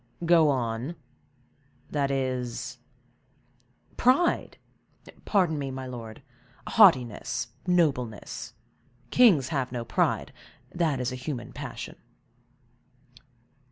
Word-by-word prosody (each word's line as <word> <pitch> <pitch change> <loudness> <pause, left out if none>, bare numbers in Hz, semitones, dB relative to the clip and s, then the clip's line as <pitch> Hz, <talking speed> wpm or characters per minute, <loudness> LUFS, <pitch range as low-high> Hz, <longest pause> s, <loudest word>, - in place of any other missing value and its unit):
"Go 165 -2 +5
on—that 135 +2 -5
is?" 130 -3 -3 1.2
"Pride! 265 +8 +2 0.7
Pardon 180 -7 +2
me, 140 -1 -3
my 130 0 -6
lord, 120 -1 -8 0.4
haughtiness, 125 - +3 0.2
nobleness; 135 - 0 0.6
kings 185 - +5
have 135 -6 -1
no 120 -2 -4
pride, 115 - 0 0.4
that 160 -6 0
is 125 0 -1
a - - -4
human 130 -1 -6
passion." - - -7
135 Hz, 85 wpm, -27 LUFS, 125-160 Hz, 1.2 s, Go